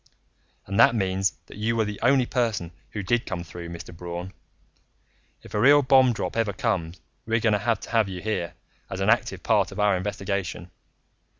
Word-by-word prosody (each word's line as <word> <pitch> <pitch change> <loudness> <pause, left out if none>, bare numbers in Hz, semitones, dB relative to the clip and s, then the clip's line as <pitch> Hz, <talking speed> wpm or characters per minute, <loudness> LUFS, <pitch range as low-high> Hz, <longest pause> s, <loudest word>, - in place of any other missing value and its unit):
"And 100 +3 -2
that 120 - +7
means 95 -2 0
that - - -13
you 115 +2 0
were 110 -1 +2
the 105 -1 -5
only 130 +1 +4
person 110 -9 -1 0.2
who 105 - -5
did 120 +5 0
come 95 -4 -4
through, 85 0 -9
Mr. 85 0 -9
Braun. 85 +2 -6 1.1
If - - -13
a 105 - 0
real 145 +5 +6
bomb 130 -1 +5
drop 115 - -3
ever 115 -3 0
comes, 90 -6 -2 0.3
we're 115 0 +2
going 110 -1 +2
to 105 - +2
have 115 +2 0
to - - -9
have 110 -4 +2
you 95 -1 -5
here, 95 -4 -3 0.3
as - - -5
an - - +3
active - - 0
part - - +2
of 95 - -8
our 105 -1 +3
investigation. 95 -2 -3
105 Hz, 195 wpm, -25 LUFS, 90-115 Hz, 1.1 s, that